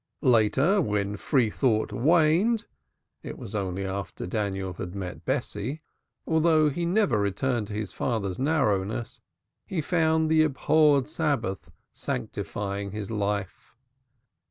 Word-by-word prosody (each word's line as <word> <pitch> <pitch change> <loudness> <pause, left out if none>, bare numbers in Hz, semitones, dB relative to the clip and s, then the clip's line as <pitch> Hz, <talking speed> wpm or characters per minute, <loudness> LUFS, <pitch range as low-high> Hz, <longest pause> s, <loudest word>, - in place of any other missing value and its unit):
Later, 130 - +4
when 105 - -1
free 115 +1 +1
thought 110 -4 +1
waned 170 - +3 0.6
(it - - -7
was 100 - -8
after 95 -1 -3
Daniel 95 -1 -2
had 90 +1 -7
met 95 -2 -6
Bessie), 130 +10 -2 0.4
although 160 -2 +3
he 170 +4 -2
never 175 - +2
returned 105 +3 0
to 105 - -7
his 105 -2 -4
father's 100 -7 -2
narrowness, 115 -7 0 0.4
he 185 - -4
found 160 0 +2
the 160 0 +4
abhorred 150 -2 +3
Sabbath 145 - -2 0.2
sanctifying 100 +9 -4
his 105 0 -5
life. 100 -1 -3
115 Hz, 115 wpm, -27 LUFS, 100-155 Hz, 0.6 s, Later